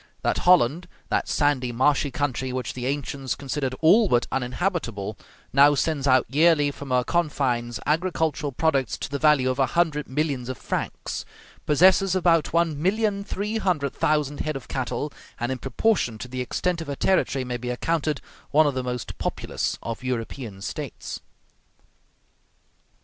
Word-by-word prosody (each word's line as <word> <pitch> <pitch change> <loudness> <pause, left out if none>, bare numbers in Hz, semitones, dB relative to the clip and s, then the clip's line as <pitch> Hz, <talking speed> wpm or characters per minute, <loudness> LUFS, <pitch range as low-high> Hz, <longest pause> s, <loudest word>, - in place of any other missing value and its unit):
That - - +1
Holland, 175 0 +4 0.2
that - - 0
sandy, 145 -4 +1
marshy 140 +4 +2
country 130 -2 -2
which 125 -2 -3
the 125 0 -4
ancients 140 -1 -2
considered 135 -1 -3
all 195 +6 +6
but 120 0 +3
uninhabitable, 125 - -2 0.4
now 145 +2 +6
sends 145 -1 0
out 130 -1 +5
yearly 150 +1 +4
from 140 0 -9
her 125 -1 +2
confines 125 -8 0
agricultural 160 -2 0
products 135 -1 0
to - - -5
the 140 - -2
value 150 -4 +4
of 130 +1 -1
a 135 - +4
hundred 155 -4 +1
millions 135 -3 -1
of 130 - -4
francs, - - -4 0.4
possesses 185 +5 +5
about 170 -3 +3
one 165 -3 +1
million 200 +2 +1
three 210 +2 -3
hundred 160 -9 0
thousand 150 -2 0
head 155 -1 -2
of 135 - -7
cattle, 130 +2 -3 0.3
and 120 +2 -1
in 130 - -3
proportion 135 - 0
to 125 - -7
the 130 0 -4
extent 170 +7 -1
of 165 - -6
her 140 - -3
territory 140 -6 +1
may 125 -1 -3
be 125 +1 -5
accounted 155 +3 -1 0.3
one 155 +2 +5
of 145 - +1
the 130 - -1
most 125 -2 -4
populous - - -2
of 115 +2 -5
European 115 -4 -4
States. 100 - -6
140 Hz, 160 wpm, -25 LUFS, 125-160 Hz, 0.4 s, all